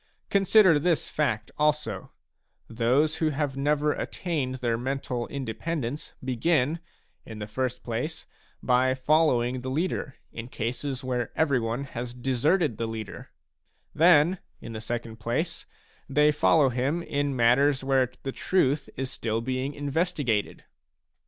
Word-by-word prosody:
Consider 195 -4 +5
this 165 0 0
fact 130 -8 -1
also: 150 -10 0 0.6
those 125 +7 +2
who 160 - +1
have 145 -2 -2
never 150 +2 +1
attained 145 -8 -3
their 120 -3 0
mental 125 -1 -3
independence 135 +2 -4
begin, 135 +4 +1 0.4
in 110 - -9
the 105 - -4
first 125 +4 -3
place, 140 +8 -4 0.4
by 130 +1 +3
following 130 -3 +2
the 130 - -4
leader 150 -1 -2 0.2
in 115 +1 -7
cases 125 +3 -3
where 125 -2 -2
every 140 -5 +2
one 115 +3 -2
has 125 -2 -6
deserted 135 - +1
the 115 - -2
leader; 110 -2 -7 0.6
then, 170 +2 +5 0.2
in 115 - -8
the 110 - -5
second 115 0 -4
place, 120 +9 -3 0.4
they 150 +2 +4
follow 150 -1 +4
him 135 +7 -1
in 145 -3 -1
matters 130 +3 +3
where 135 -2 +2
the 135 - -2
truth 145 -3 +1
is 130 0 -2
still 110 0 -2
being 130 +4 -2
investigated. 145 - -1
135 Hz, 135 wpm, -27 LUFS, 120-150 Hz, 0.6 s, Consider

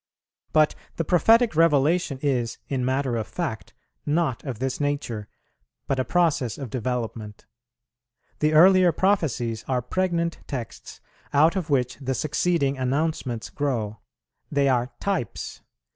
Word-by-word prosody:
But 155 -1 +4 0.2
the 165 - -2
prophetic 225 +5 +4
Revelation 155 -1 +3
is, 125 -5 0
in 130 -2 -1
matter 130 -1 0
of 110 -1 -3
fact, 130 - -5 0.3
not 150 -4 0
of 130 -6 -5
this 130 +2 -2
nature, 140 -8 -2 0.6
but 135 - -1
a - - +2
process 145 - +1
of 130 -6 -7
development: 115 -3 -4 0.9
the 155 0 +2
earlier 180 +2 +7
prophecies 145 - 0
are 125 -2 0
pregnant 170 +3 -1
texts 125 -6 -7 0.3
out 155 +5 +5
of 180 -4 -2
which 125 -3 +1
the 130 -1 -3
succeeding 150 -1 0
announcements 130 -3 -1
grow; 115 -7 -2 0.5
they 140 -1 +2
are 125 -2 +1
types. 190 - -3
140 Hz, 130 wpm, -25 LUFS, 125-165 Hz, 0.9 s, earlier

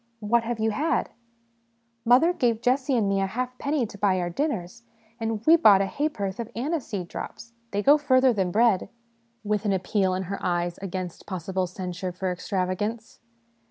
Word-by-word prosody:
" - - -44
What 235 - +6
have 240 0 -2
you 220 0 +1
had? 305 +9 0 0.3
" 235 0 -43
" 230 - -45 0.2
Mother 260 +9 +5
gave 235 -7 0
Jessie 260 +1 +2
and 215 -3 +1
me 195 0 +1
a 195 - +1
halfpenny 255 +5 -2
to 205 -2 -11
buy 190 -2 +2
our 175 -1 -2
dinners, 230 - -3 0.4
and 225 -1 -3
we 325 - +8
bought 210 -12 +7
a - - 0
haporth 205 -5 -3
of 235 -1 -4
aniseed 240 - -3
drops 230 +6 -8 0.2
they 205 -1 -2
go 290 +5 +6
further 260 -3 +4
than 190 -4 0
bread 215 0 +2 0.3
" 230 0 -42
with 210 -1 +1
an 205 -2 +1
appeal 190 0 0
in 190 - -2
her 195 +2 -6
eyes 175 -1 -1
against 185 -2 -6
possible 185 0 -2
censure 180 0 -5
for 185 +1 -3
extravagance. 195 +5 -3
215 Hz, 190 wpm, -26 LUFS, 190-240 Hz, 0.4 s, we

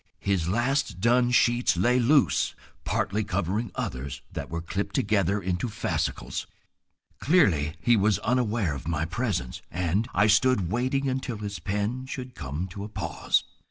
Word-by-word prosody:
His 95 -4 0
last 120 -1 0
done 120 +4 +3
sheets 120 -6 +3
lay 120 +8 +3
loose, 125 - +3 0.3
partly 105 +2 0
covering 100 +4 -1
others 65 +2 -4
that - - -5
were 85 - -3
clipped 100 +3 -3
together 100 -1 +2
into 90 +4 -2
fascicles. 65 - -2 0.7
Clearly 90 - +3
he 120 - +4
was 105 -2 +3
unaware 115 - +1
of 70 +1 -7
my 80 -2 0
presence, 90 - -2
and 90 +6 0
I 100 - +3
stood 105 -4 +3
waiting 130 +4 0
until 130 -3 -2
his 100 -3 -5
pen 105 +8 -2
should 130 -1 -6
come 75 - -4
to 100 +3 -7
a 105 - -6
pause. - - 0
105 Hz, 150 wpm, -27 LUFS, 85-120 Hz, 0.7 s, he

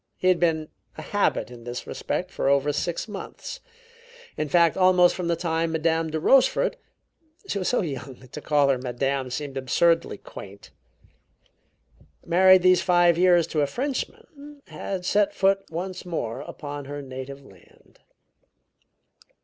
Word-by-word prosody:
He 185 - +2
had 180 -2 +3
been 160 -3 +1 0.3
a 155 - -7
habit 205 -8 0
in 120 -1 -11
this 120 +1 -6
respect - - -4
for - - -1
over 140 +1 +2
six 170 +6 -2
months; 210 - -8 0.8
in 155 - -3
fact, 170 +1 +4
almost 185 -1 +5
from 180 -2 -4
the 170 - +1
time 165 -1 -1
Madame 160 0 0
de 160 0 -2
Rochefort 270 - +3 0.7
(she 200 - -2
was 185 - -2
so 250 - +2
young 140 -4 -6
that 130 0 -18
to 150 - -7
call 145 -2 +2
her 130 -2 +2
Madame 130 +1 -2
seemed 135 +1 -5
absurdly 165 +2 +1
quaint), 100 0 -12 1.5
married 185 +1 +6
these 185 -1 +5
five 175 -2 +4
years 175 -1 +4
to 155 - -1
a 145 - +2
Frenchman, 280 - -6
had 190 -2 -5
set 205 +2 +2
foot 195 0 +3
once 180 +3 -5
more 135 -9 -4
upon 145 -1 -7
her 145 +1 -6
native 135 +1 -8
land. 95 -7 -21
165 Hz, 150 wpm, -25 LUFS, 140-185 Hz, 1.5 s, married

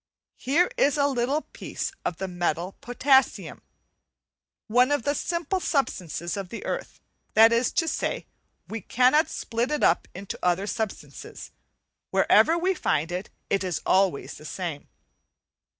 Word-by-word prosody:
Here 330 - +2
is 295 - +3
a 280 - +3
little 275 +2 0
piece - - -5
of 165 - -2
the 190 - -3
metal 175 0 -2
potassium, 265 +2 +2 1.0
one 250 +4 +3
of 290 -5 +1
the 285 - +1
simple 340 +4 -2
substances 175 - -2
of 195 -3 -5
the 230 - -7
earth; - - -4 0.4
that 225 +1 +7
is 235 +1 +2
to 330 - +1
say, - - -2 0.4
we 225 0 -5
cannot 255 - +3
split 235 +3 -2
it 300 0 -1
up 170 - +3
into 195 +2 -7
other 180 +2 +1
substances, 215 0 -6 0.6
wherever 330 +1 +4
we 370 +3 +1
find 155 - -1
it, 180 +3 -4 0.2
it 195 -1 +2
is 180 -4 -2
always 190 -6 +2
the 150 - -13
same. 165 -1 -5
230 Hz, 145 wpm, -26 LUFS, 180-285 Hz, 1.0 s, that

